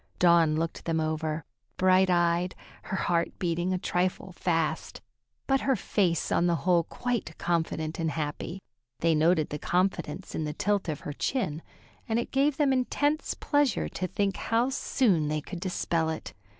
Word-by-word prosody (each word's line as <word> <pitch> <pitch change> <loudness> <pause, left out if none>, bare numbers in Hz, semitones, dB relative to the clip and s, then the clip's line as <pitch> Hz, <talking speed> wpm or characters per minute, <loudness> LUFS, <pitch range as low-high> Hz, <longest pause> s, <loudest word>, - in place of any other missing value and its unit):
Dawn 170 -3 +5
looked 165 +1 -3
them 165 -1 0
over, 155 0 -2 0.3
bright 185 0 +4
eyed, 175 0 +2 0.3
her 190 - -2
heart 170 -2 0
beating 175 +1 -1
a 185 - +1
trifle 180 +1 -1
fast, 165 -3 -1 0.5
but 270 0 +2
her 270 -1 +2
face 180 -5 0
on 175 - +3
the 170 - +3
whole 175 -3 +4
quite 240 -9 -3
confident 160 -1 -1
and 165 -1 0
happy. 155 +4 -4 0.4
They 165 0 +4
noted 155 0 +3
the 150 - -4
confidence 180 -1 -1
in 160 - -2
the 150 -1 -3
tilt 200 +2 0
of 150 - -3
her 145 - -5
chin, 160 - -1 0.5
and 225 - +2
it 235 - -2
gave 275 +1 +2
them 285 -3 +3
intense 290 +4 0
pleasure 290 -4 +1
to 185 - -3
think 200 +1 -1
how 235 +3 +1
soon 200 - +2
they 155 +1 0
could 175 +4 -7
dispel 170 -3 0
it. 160 - -5
175 Hz, 165 wpm, -28 LUFS, 160-200 Hz, 0.5 s, Dawn